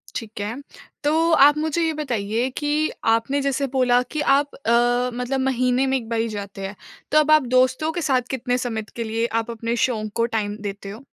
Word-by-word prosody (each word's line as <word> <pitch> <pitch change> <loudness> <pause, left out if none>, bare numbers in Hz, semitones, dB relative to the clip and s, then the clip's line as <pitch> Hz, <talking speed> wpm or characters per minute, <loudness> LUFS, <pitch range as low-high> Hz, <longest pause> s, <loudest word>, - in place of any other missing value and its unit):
ठीक 225 -3 -6
है। 210 +3 -3 0.5
तो 320 +3 +2
आप 290 +1 +6
मुझे 315 +2 -1
ये 320 -1 0
बताइए 240 -5 -2
कि 300 +1 0 0.2
आपने 270 +5 0
जैसे 275 0 0
बोला 250 -1 +4
कि 305 - -2
आप 285 0 +2
अ, 245 0 +2
मतलब 250 +2 -2
महीने 255 0 +1
में 265 0 +2
1 230 -3 -8
बार 230 -1 -1
ही 230 - 0
जाते 200 -2 -6
हैं। 200 - -9 0.4
तो 305 - +6
अब 305 0 +2
आप 310 -1 +6
दोस्तों 260 +5 +3
के 345 - -3
साथ 265 -5 +2
कितने 250 -1 -1
समय 230 -3 -3
के 235 - -3
लिए 225 +1 -1 0.2
आप 230 +1 -7
अपने 230 +1 -3
शौक 215 -4 -3
को 230 - +2
टाइम 205 -1 -2
देते 200 -1 -6
हो? 215 +6 -9
250 Hz, 210 wpm, -22 LUFS, 225-285 Hz, 0.5 s, आप